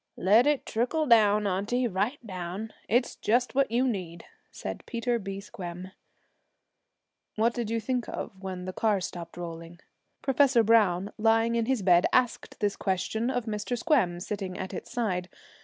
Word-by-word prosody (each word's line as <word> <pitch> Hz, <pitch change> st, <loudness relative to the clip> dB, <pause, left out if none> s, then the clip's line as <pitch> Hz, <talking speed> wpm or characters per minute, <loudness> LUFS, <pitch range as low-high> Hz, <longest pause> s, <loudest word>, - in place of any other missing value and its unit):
'Let 215 Hz, +8 st, +5 dB
it 295 Hz, -2 st, +1 dB
trickle 255 Hz, +8 st, 0 dB
down, 210 Hz, -4 st, +5 dB
auntie 205 Hz, +6 st, 0 dB
right 210 Hz, +7 st, -1 dB
down. 185 Hz, +2 st, -5 dB, 0.2 s
It's 240 Hz, +3 st, +1 dB
just 245 Hz, +3 st, +1 dB
what 275 Hz, +1 st, +2 dB
you 245 Hz, +3 st, +2 dB
need,' 175 Hz, -7 st, -4 dB, 0.2 s
said -, -, -6 dB
Peter 235 Hz, 0 st, -1 dB
B. 195 Hz, -1 st, -5 dB
Squem. 185 Hz, -2 st, -8 dB, 1.4 s
'What 230 Hz, +2 st, +2 dB
did 235 Hz, -3 st, -3 dB
you 230 Hz, 0 st, 0 dB
think 245 Hz, +1 st, -2 dB
of -, -, -5 dB
when 185 Hz, -2 st, -5 dB
the 185 Hz, -, -5 dB
car 210 Hz, -1 st, +1 dB
stopped 175 Hz, -2 st, -7 dB
rolling?' 165 Hz, 0 st, -7 dB, 0.4 s
Professor 270 Hz, -3 st, +4 dB
Browne, 205 Hz, -4 st, +3 dB
lying 225 Hz, +1 st, +3 dB
in 230 Hz, -1 st, 0 dB
his 260 Hz, -6 st, 0 dB
bed, 180 Hz, -1 st, +5 dB
asked 250 Hz, -2 st, 0 dB
this 205 Hz, -1 st, +1 dB
question 220 Hz, +5 st, -1 dB
of 245 Hz, -3 st, -1 dB
Mr. 220 Hz, +2 st, -3 dB
Squem, 230 Hz, -, +2 dB
sitting 195 Hz, -1 st, -4 dB
at 190 Hz, -, -5 dB
its -, -, -7 dB
side. 185 Hz, -7 st, -1 dB
215 Hz, 160 wpm, -28 LUFS, 185-240 Hz, 1.4 s, Let